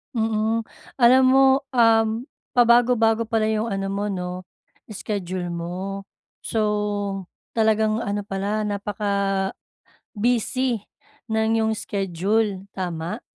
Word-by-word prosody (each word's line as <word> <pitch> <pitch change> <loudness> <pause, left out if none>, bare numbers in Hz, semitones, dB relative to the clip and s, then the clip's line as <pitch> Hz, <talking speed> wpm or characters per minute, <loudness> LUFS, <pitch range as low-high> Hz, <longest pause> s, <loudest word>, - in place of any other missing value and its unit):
Mhm, 220 0 0 0.3
alam 255 +1 +6
mo 265 +1 +6 0.3
um, 225 -1 +4 0.3
pabago-bago 235 -2 +4
pala 225 0 +1
'yong 220 +1 0
ano 195 -2 -2
mo 200 +1 -2
'no 180 -3 -3 0.6
iskediul 185 -4 -4
mo. 185 +3 -5 0.3
So 205 -3 -1 0.3
talagang 220 -1 +2
ano 205 -2 -2
pala, 200 +2 -2
napaka-busy 200 -1 -2 1.6
ng 220 -1 +1
'yong 220 0 +1
iskediul, 200 0 -1
tama? 175 -3 -4
210 Hz, 95 wpm, -23 LUFS, 195-225 Hz, 1.6 s, alam